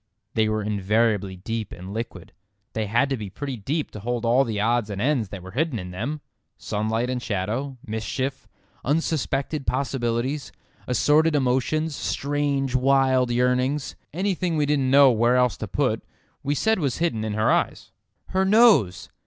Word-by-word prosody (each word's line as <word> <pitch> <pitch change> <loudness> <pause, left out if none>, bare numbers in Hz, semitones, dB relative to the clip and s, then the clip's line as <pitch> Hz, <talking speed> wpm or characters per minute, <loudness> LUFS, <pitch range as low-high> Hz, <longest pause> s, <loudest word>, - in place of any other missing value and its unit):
They 110 -1 +2
were 110 0 -1
invariably 105 -1 +1
deep 110 +3 -4
and 90 +3 -8
liquid. 115 +2 -6 0.4
They 110 -1 -2
had 120 +7 +2
to 135 - +1
be 105 -3 -6
pretty 135 +7 -5
deep 140 +8 -3
to 105 - -8
hold 120 +2 -2
all 120 +4 +4
the 110 -5 -3
odds 115 0 +1
and 100 -1 -4
ends 125 -3 +1
that 95 -2 -8
were 95 - -9
hidden 140 - 0
in 90 -3 -6
them; 130 +11 -4 0.4
sunlight 110 +3 -1
and 125 -1 -2
shadow, 115 +7 -2
mischief, 130 +5 -3 0.4
unsuspected 150 -1 -1
possibilities, 130 +1 -1 0.4
assorted 150 +6 +3
emotions, 145 +4 +1
strange 140 -2 -1
wild 130 -1 +3
yearnings. 125 +3 +1 0.2
Anything 180 -1 -1
we 150 - +2
didn't 140 -3 +1
know 140 0 +7
where 120 +2 +3
else 125 -2 +3
to - - -5
put - - 0 0.4
we 145 +1 -1
said 220 +6 +2
was 140 -6 -1
hidden 140 -11 0
in 110 -1 -2
her 110 +1 +2
eyes. - - -1 0.4
"Her 190 0 +1
nose!" 195 - +4
125 Hz, 160 wpm, -24 LUFS, 110-145 Hz, 0.4 s, know